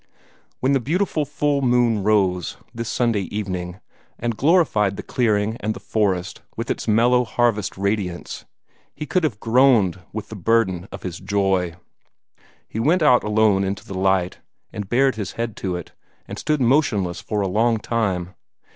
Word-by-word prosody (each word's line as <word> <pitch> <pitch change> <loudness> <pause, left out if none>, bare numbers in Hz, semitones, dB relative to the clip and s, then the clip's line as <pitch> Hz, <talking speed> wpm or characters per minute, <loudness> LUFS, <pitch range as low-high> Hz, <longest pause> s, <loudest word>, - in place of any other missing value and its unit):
When 130 - +2
the 135 - +3
beautiful 160 +3 0
full 145 0 0
moon 120 -4 +2
rose, 95 -4 +1 0.2
this 115 0 -4
Sunday 115 -6 0
evening, 95 -3 -4 0.4
and 120 -1 -2
glorified 130 - +2
the - - -5
clearing 110 -2 0
and 110 +1 -2
the - - -8
forest 100 -4 -1 0.2
with 115 +1 -2
its - - -4
mellow 120 +3 +4
harvest 115 -5 0
radiance, 100 -3 -3 0.5
he 150 - -5
could 185 +3 0
have 115 -10 -1
groaned 115 -7 +3
with 110 0 -6
the 110 - -7
burden 100 -3 +1
of - - -9
his 90 -2 -5
joy. 95 -4 0 0.9
He 110 - -5
went 160 +8 +2
out 125 -5 +5
alone 105 -2 +3
into 100 +2 -3
the 100 - -8
light, 95 -1 +1 0.3
and 105 -2 -6
bared 130 -1 +2
his 105 -4 -4
head 115 -2 -3
to 95 -2 -2
it, 90 - -7 0.4
and - - -7
stood 150 -2 0
motionless 115 - +1
for 105 -2 -2
a 100 - 0
long 115 +4 +2
time. 100 -5 -2
110 Hz, 165 wpm, -22 LUFS, 95-120 Hz, 0.9 s, out